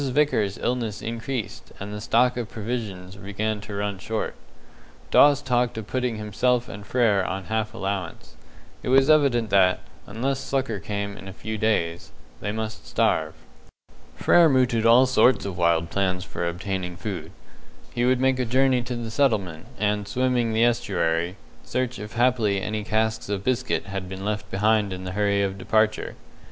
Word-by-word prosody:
Vickers's 125 -8 +1
illness 115 -4 -2
increased, 115 0 -5
and 100 +1 -6
the 105 - -5
stock 125 +3 +3
of 120 -3 -4
provisions 105 -5 -5
began 105 +2 -3
to 100 0 -7
run 100 -1 -2
short. 110 +2 -3 0.8
Dawes 145 0 +6
talked 125 -2 +1
of 110 - -4
putting 125 0 -1
himself 120 +4 0
and 100 +1 -8
Frere 105 -3 +2
on 95 +1 -3
half 110 +1 -2
allowance. 95 -9 -4 0.5
It - - -4
was 135 +3 +5
evident 130 -7 +3
that, 95 -2 +4 0.3
unless 130 +6 -2
succour 130 -7 -2
came 100 0 -4
in 95 - -10
a 95 - -7
few 110 +2 -5
days, 95 -6 -1 0.3
they 105 - -3
must 110 0 -5
starve. 80 0 +1 0.8
Frere 165 - +5
mooted 125 -4 +3
all 120 +3 +7
sorts 130 -3 +3
of 100 -3 -4
wild 85 -1 +1
plans 95 -2 0
for 85 -2 -4
obtaining 90 0 -4
food. 100 -3 -5 0.6
He 120 - 0
would 125 0 +3
make 130 0 +2
a 125 - +1
journey 130 +1 +3
to 120 +1 -4
the 115 -1 -5
settlement, 100 - 0
and, 105 0 0
swimming 125 +1 +1
the 110 +1 +3
estuary, 85 -6 0 0.3
search 125 -3 -2
if 105 +2 -8
haply 120 -5 +2
any 105 +2 -3
casks 110 0 -1
of 100 -1 -2
biscuit 130 +1 0
had 95 -2 -5
been 95 +1 -6
left 105 0 -3
behind 105 0 +2
in 95 0 -6
the 95 - -5
hurry 100 0 +1
of 95 0 -3
departure. 110 +2 +1
110 Hz, 165 wpm, -24 LUFS, 100-125 Hz, 0.8 s, all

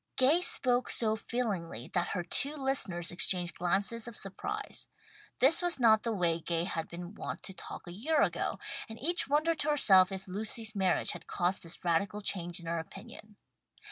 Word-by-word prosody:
Gay 280 +7 +4
spoke 255 -7 +2
so 220 -2 +1
feelingly 195 - -3
that 175 -1 +1
her 180 - -2
two 280 - 0
listeners 260 - 0
exchanged 175 0 0
glances 200 +6 0
of 235 - -8
surprise. 415 - -4 0.5
This 280 +8 +6
was 350 -4 +1
not 220 -3 +6
the 230 - -2
way 170 -5 +1
Gay 170 0 -1
had 165 -3 -3
been 175 +2 -8
wont - - -6
to 190 - -6
talk - - -9
a 175 - -8
year 290 - 0
ago, - - -1 0.3
and 220 - -8
each 345 +7 +1
wondered 310 +3 +1
to 300 - +2
herself 195 -10 +6
if 190 0 -6
Lucy's 215 +3 -1
marriage 190 -2 +1
had - - -9
caused 180 +1 0
this 165 +1 -10
radical 200 +5 +1
change 175 -2 -1
in 170 - -11
her 165 0 -1
opinion. 210 +5 -11
205 Hz, 180 wpm, -31 LUFS, 175-250 Hz, 0.5 s, This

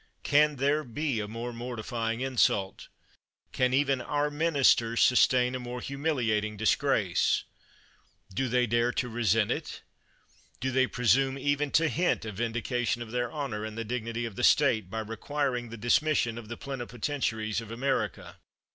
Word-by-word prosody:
Can 150 +1 +4
there 140 +3 +1
be 135 0 -2
a 105 - -3
more 115 +3 -5
mortifying 115 -1 -4
insult? 120 -7 +1 0.6
Can 125 -1 +1
even 135 -1 +2
our 145 +2 -1
ministers 140 -7 +3
sustain 125 0 +4
a 130 - -3
more 125 0 -6
humiliating 120 -7 -1
disgrace? 110 +1 +2 0.9
Do 130 +7 -1
they 125 +1 +2
dare 120 +1 +1
to 125 - -1
resent 115 -3 +1
it? - - -4 0.8
Do 130 - -1
they 130 0 +3
presume 130 +3 +2
even 145 +1 0
to 165 0 +4
hint 170 -7 0
a 110 - -4
vindication 120 +2 -2
of 110 - -11
their 120 -1 -1
honor, 135 -8 -4
and 110 0 -6
the 115 - -3
dignity 115 0 -3
of 115 -4 -7
the 125 - -3
State, 120 -11 +4
by 110 +3 -3
requiring 125 +2 -3
the 115 - -8
dismission 120 0 +1
of 110 - -11
the 115 +1 -7
plenipotentiaries 120 -4 -3
of 115 -1 -10
Amer 135 +4 0
ica - - -14
120 Hz, 155 wpm, -28 LUFS, 115-135 Hz, 0.9 s, Can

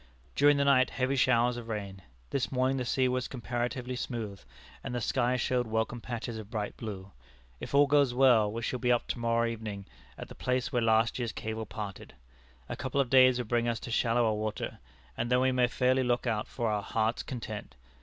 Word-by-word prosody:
During 145 0 +5
the 140 - +2
night 130 -2 +4
heavy 130 +1 -1
showers 120 -1 +3
of 120 -1 -7
rain. 100 -3 -5 0.3
This 135 -3 -1
morning 130 +1 +1
the 125 - -2
sea 130 +1 +2
was 125 0 -1
comparatively 125 0 -3
smooth, 115 -5 -5 0.4
and 125 - -4
the - - 0
sky 125 +1 +1
showed 125 -1 0
welcome 110 +2 -1
patches 115 -1 -5
of 105 -1 -9
bright 105 -2 -3
blue. 100 -4 -7 0.5
If - - -5
all 145 +1 +7
goes 140 -2 +3
well, 120 -5 +4
we 115 +2 -5
shall 125 - -2
be 125 0 +1
up 120 - +2
to - - -2
morrow 115 0 +1
evening 110 -4 -5 0.3
at - - -7
the - - -10
place 125 +1 -2
where 120 - +2
last 115 +2 +2
year's 120 -2 -2
cable 110 0 -5
parted. 105 -4 -7 0.5
A - - -4
couple 130 +1 -2
of 130 -3 +1
days 130 -1 +6
would 125 -3 -3
bring 120 0 +1
us 115 -1 -1
to 120 - -7
shallower 115 -1 +2
water, 105 0 -4 0.4
and 120 +2 -2
then 125 - +4
we 130 0 +3
may 125 -1 +3
fairly 130 +2 +2
look 125 -1 0
out 110 -3 -1
for 120 -3 -3
our 105 -1 0
'Heart's 110 +2 -1
Content.' 110 -5 -7
120 Hz, 210 wpm, -30 LUFS, 110-130 Hz, 0.5 s, all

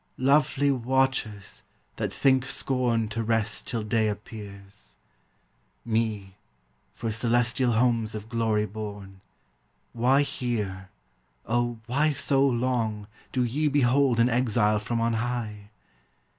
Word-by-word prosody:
Lovely 140 +1 +3
watchers, 130 -5 -1 0.4
that - - -2
think 130 -2 +3
scorn 125 -4 0
To 115 +1 -3
rest 115 -1 -1
till 115 -3 -2
day 110 0 +1
appears! 100 -2 -8 0.9
Me, 110 -4 -2 0.6
for 115 - -3
celestial 120 +2 +1
homes 115 -2 +1
of 110 0 -6
glory 110 -2 0
born, 100 -2 -8 0.7
Why 130 +4 +3
here, 105 -8 -3 0.6
O, 120 +1 0
why 145 +6 +1
so 135 -1 +2
long, 120 -5 0 0.3
Do 125 - +1
ye 140 +6 0
behold 135 -3 +3
an 115 - +5
exile 115 -4 +2
from 115 +2 -2
on 115 0 +1
high? 115 -3 -3
115 Hz, 115 wpm, -26 LUFS, 105-125 Hz, 0.9 s, an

